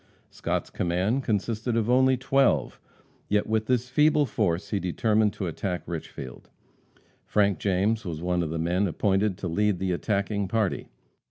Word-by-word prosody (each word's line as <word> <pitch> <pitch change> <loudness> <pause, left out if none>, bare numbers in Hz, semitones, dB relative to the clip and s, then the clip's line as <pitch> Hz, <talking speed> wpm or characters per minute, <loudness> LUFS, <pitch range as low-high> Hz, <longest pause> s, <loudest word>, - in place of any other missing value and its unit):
Scott's - - -3
command 95 +9 0
consisted 110 +2 -1
of 115 -1 +1
only 130 +1 +4
twelve. 135 +1 +1 0.5
Yet 105 0 +2
with 110 0 -1
this 125 -1 +1
feeble 150 +3 +3
force 100 -7 -1
he 100 - +1
determined 105 +4 +1
to 95 - -4
attack 90 +2 -3
Richfield. 70 -6 -7 0.7
Frank 100 -2 +1
James 100 +3 +1
was 85 -5 -5
one 90 +1 0
of 80 - -2
the 80 - -3
men 90 +5 +1
appointed 95 +2 +1
to 95 - -4
lead 105 +3 +1
the 95 +1 -1
attacking 100 +2 -1
party. 110 -1 -1
100 Hz, 155 wpm, -26 LUFS, 90-110 Hz, 0.7 s, only